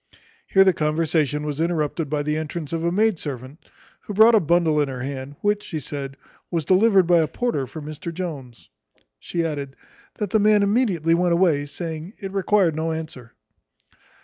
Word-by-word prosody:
Here 195 - +5
their 190 -1 +4
conversation 150 -2 0
was 150 +1 -3
interrupted 165 -2 -1
by 150 0 -1
the 150 +1 -1
entrance 155 0 -5
of 165 0 -2
a 170 - +1
maid 210 -1 +2
servant, 135 +1 -7 0.4
who 205 - -8
brought 220 +3 +7
a 220 - +6
bundle 165 -3 +2
in 145 - 0
her 130 -2 -6
hand, 135 +1 -6
which, 205 0 +1
she 160 -6 -5
said, 140 0 -6 0.3
"was 165 -4 -2
delivered 190 +1 +4
by 175 0 +4
a 160 - +2
porter 150 - -2
for 155 +2 -9
Mr 155 +2 -6
Jones." 145 - -7 0.5
She 170 - -2
added, 140 -4 -4 0.4
"That 205 -3 -4
the 220 - +3
man 210 0 +4
immediately 200 -7 +2
went 175 0 +2
away, 165 -5 +2
saying, 160 +4 -6
it 195 -3 -6
required 195 -4 +2
no 160 +1 -1
answer." 155 -7 -7
160 Hz, 180 wpm, -23 LUFS, 145-185 Hz, 0.5 s, brought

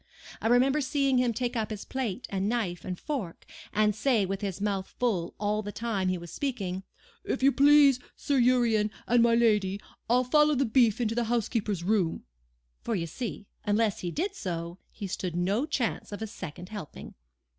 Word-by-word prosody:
I - - 0
remember 260 +5 +4
seeing 275 -1 +2
him 250 -1 +2
take 245 +2 -2
up 220 -2 -1
his 215 -2 -6
plate 250 -4 -3
and 195 +1 0
knife 195 -8 -2
and 180 -1 -5
fork, 245 - -5 0.3
and 210 -1 +2
say 220 -2 +2
with 195 +2 -3
his 195 -3 -3
mouth 195 -2 -2
full 195 -9 -1
all 210 +1 0
the 205 -1 -6
time 210 -4 -2
he 185 - 0
was 170 -1 -9
speaking: 200 -10 -3 0.4
'If - - -2
you 275 - +6
please, 280 -1 +6 0.2
Sir 280 -2 0
Urian, 235 -4 +3 0.2
and 240 0 +4
my 230 0 +5
lady, 210 -4 +2 0.3
I'll 250 +2 +4
follow 300 +4 +4
the 275 +1 +2
beef 230 -1 +3
into 225 -2 0
the 235 0 0
housekeeper's 220 -5 -1
room;' 185 -4 +1 0.6
for 230 - -2
you 170 -4 -1
see, 210 +4 -5 0.2
unless 210 0 +1
he 175 - -3
did 360 - -2
so, 170 - -5
he 205 - -7
stood 180 -2 -3
no 200 - 0
chance 245 -8 -2
of 205 +2 -5
a - - -1
second 180 -4 -8
helping. 205 -8 -8
220 Hz, 190 wpm, -28 LUFS, 195-250 Hz, 0.6 s, you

